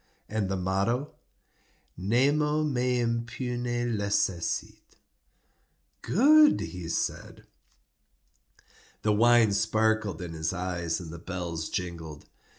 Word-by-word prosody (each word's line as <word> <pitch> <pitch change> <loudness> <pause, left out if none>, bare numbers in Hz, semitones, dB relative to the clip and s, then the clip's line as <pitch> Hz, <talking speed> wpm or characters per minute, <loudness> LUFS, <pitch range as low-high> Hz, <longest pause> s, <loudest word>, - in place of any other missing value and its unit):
"And 105 -3 -2
the 95 - -1
motto?" 100 +9 -1 0.8
"Nemo 145 - +2
me 125 -4 0
impune 120 0 -2
lacessit." 100 -4 -2 1.1
"Good!" 300 - +5
he 90 -3 -6
said. - - -3 1.6
The 105 - +3
wine 115 -1 +5
sparkled 110 -3 +1
in 85 -2 -6
his 80 +1 -2
eyes 90 -2 -2
and 85 -3 -8
the 85 - -8
bells 85 -3 -5
jingled. 85 -4 -5
105 Hz, 95 wpm, -28 LUFS, 90-120 Hz, 1.6 s, Good